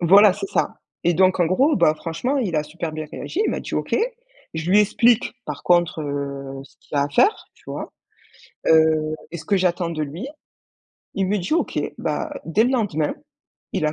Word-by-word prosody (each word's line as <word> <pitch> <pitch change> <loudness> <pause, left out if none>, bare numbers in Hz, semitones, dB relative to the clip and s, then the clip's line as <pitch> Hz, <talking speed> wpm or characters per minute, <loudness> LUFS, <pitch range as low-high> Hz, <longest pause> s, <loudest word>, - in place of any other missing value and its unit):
Voilà, 195 +3 +7
c'est 390 - -5
ça. - - 0 0.3
Et 175 0 +3
donc, 185 +1 +3
en 170 - +4
gros, 270 - +3
ben 155 - +4
franchement, 170 - -2
il 185 -10 -1
a 150 - +2
super 160 +1 -5
bien 155 0 -5
réagi. 385 - -4
Il - - +1
m'a - - -2
dit: - - -6
«OK». - - 0 0.6
Je 160 +3 -2
lui 205 - +7
explique, 225 +4 +3
par - - -6
contre, 175 -2 +2
heu, 140 -2 -4
ce - - -21
qu'il 145 - -7
y - - +3
a - - +4
à - - -3
faire, 395 - +2
tu - - -26
vois? - - -6 0.8
Heu, 160 -1 +4 0.2
et 170 - -5
ce 160 - -9
que 200 - +2
j'attends 180 -1 +1
de 155 -2 -3
lui, 165 - -6 0.9
il 195 -1 0
me 205 +1 +1
dit: 185 - -1
«OK». 340 - 0 0.2
Bah, 320 - -2
dès 185 +7 +2
le 250 - +2
lendemain, 195 - 0 0.6
il 155 - 0
a 150 - 0
175 Hz, 210 wpm, -22 LUFS, 155-205 Hz, 0.9 s, Voilà